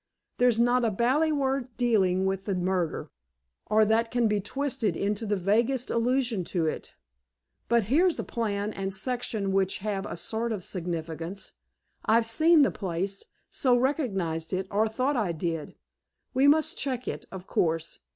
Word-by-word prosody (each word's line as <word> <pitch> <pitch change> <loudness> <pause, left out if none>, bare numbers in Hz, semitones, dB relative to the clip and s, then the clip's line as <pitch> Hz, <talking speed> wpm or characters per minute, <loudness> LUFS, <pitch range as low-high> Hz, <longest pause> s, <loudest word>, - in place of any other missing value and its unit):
There's 245 -2 +4
not 245 +1 +3
a 230 - +3
bally 255 +10 +2
word 270 -4 -1
dealing 190 -6 +2
with 190 0 -1
the 195 - -1
murder, 180 -2 -1 0.6
or 215 +1 +4
that 225 +2 +2
can 240 -1 +2
be 210 -1 +1
twisted 260 - -2
into 205 +2 -1
the 205 - +1
vaguest 230 +7 +1
allusion 235 -3 +1
to 170 -2 -1
it. 155 - -4 0.7
But 235 -1 +4
here's 320 - +3
a - - -2
plan 210 -2 -2
and 195 0 -3
section 220 -2 -2
which 190 -1 +1
have 200 -1 -3
a - - -6
sort 225 +6 -2
of 195 -4 -5
significance. 170 +1 -4 0.5
I've 225 +1 +3
seen 310 +7 +5
the - - +2
place, 195 +1 -3 0.3
so 250 -4 +2
recognized 195 - -1
it, 185 +1 -1
or 210 +2 +2
thought 255 +6 0
I 205 -8 0
did. 165 -1 -4 0.6
We 270 +2 +4
must 315 +3 +3
check 255 -3 -2
it, - - -4
of 190 -1 -8
course. 165 -3 -1
215 Hz, 160 wpm, -27 LUFS, 190-250 Hz, 0.7 s, seen